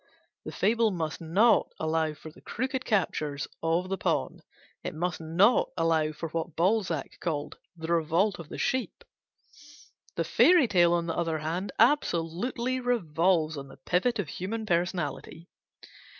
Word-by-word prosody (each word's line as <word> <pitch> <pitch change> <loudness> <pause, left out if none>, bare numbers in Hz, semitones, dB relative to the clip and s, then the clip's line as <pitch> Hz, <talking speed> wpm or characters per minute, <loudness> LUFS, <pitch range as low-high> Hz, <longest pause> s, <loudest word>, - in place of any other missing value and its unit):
The - - -5
fable 225 +2 +2
must 165 -5 -4
not 195 +9 +3
allow 160 -1 0
for 155 +1 -11
the 170 - -18
crooked 260 +2 -3
captures 155 - -1
of 165 +3 0
the 195 0 -3
pawn; - - -1 0.4
it 175 - -5
must 175 +2 -2
not 180 +9 +3
allow 160 -2 +2
for 160 +2 -6
what 165 0 -4
Balzac 175 -4 0
called 150 -4 -3 0.2
"the 165 +1 -2
revolt 170 +5 +1
of 160 -3 -10
a - - -6
sheep" 260 -1 -2 1.1
The - - 0
fairy 345 -7 +5
tale, 175 -4 +4
on 170 -1 +1
the 165 - -3
other 165 -2 -1
hand, 165 +6 -3
absolutely 235 - +1
revolves 170 -9 +1
on 140 0 -7
the - - -14
pivot 180 - 0
of 205 -6 -2
human 220 +8 -4
personality. 170 -3 -2
170 Hz, 150 wpm, -28 LUFS, 160-210 Hz, 1.1 s, fairy